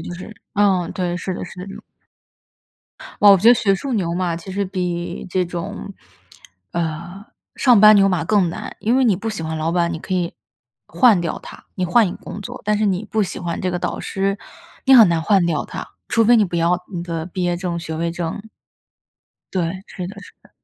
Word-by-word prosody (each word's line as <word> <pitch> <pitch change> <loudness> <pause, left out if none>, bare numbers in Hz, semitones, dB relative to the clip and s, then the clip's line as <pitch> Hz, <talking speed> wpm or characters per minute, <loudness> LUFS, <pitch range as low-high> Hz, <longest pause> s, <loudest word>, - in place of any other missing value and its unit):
就 175 - -6
是 185 +4 -9 0.2
嗯， 195 -4 +2
对， 175 -1 -2
是 185 +1 -4
的 - - -5
是 185 - -11
的 185 - -7
这 195 - -8
种。 - - -11 1.4
哇， 205 - +9
我 - - +7
觉 215 +6 +4
得 245 - +9
学 200 -3 +2
术 265 +7 -4
牛 170 -5 -1
马 175 -2 -1
其 185 +3 -8
实 200 +1 -1
比 180 -2 -4
这 180 0 0
种， 175 +3 -6 0.8
呃， 170 +5 -4 0.3
上 245 -6 +5
班 215 0 +9
牛 195 0 +5
马 175 -3 0
更 195 -2 +2
难。 - - -7
因 235 +4 +1
为 265 - +3
你 205 -6 +3
不 225 +3 -4
喜 195 -6 -4
欢 160 0 -3
老 160 +2 -1
板， 170 -1 +1
你 160 - -4
可 185 - -4
以 175 -2 -1 0.5
换 230 -9 +4
掉 170 - -3
他， - - -12
你 185 - -1
换 205 +5 +4
一 175 - -3
个 - - -9
工 205 - -8
作。 - - -8
但 210 0 +1
是 215 - +1
你 190 +2 0
不 220 +1 -1
喜 185 - -6
欢 170 -1 -3
这 185 -1 -1
个 180 - -1
导 - - -3
师， 195 +1 -2 0.5
你 265 -1 +6
很 225 -7 +9
难 165 -1 +1
换 195 0 +3
掉 165 -3 0
他， - - -7 0.2
除 225 0 +2
非 240 +2 +6
你 215 - +4
不 175 - -6
要 175 +2 +1
你 170 - -3
的 165 -1 -4
毕 185 0 -4
业 175 0 0
证、 175 -1 -3
学 160 -1 -5
位 170 +1 -1
证。 175 +5 -5 1.0
对， 185 +1 -2
是 180 -3 -6
的 200 - -9
是 - - -14
的。 - - -23
185 Hz, 245 characters per minute, -20 LUFS, 170-205 Hz, 1.4 s, 哇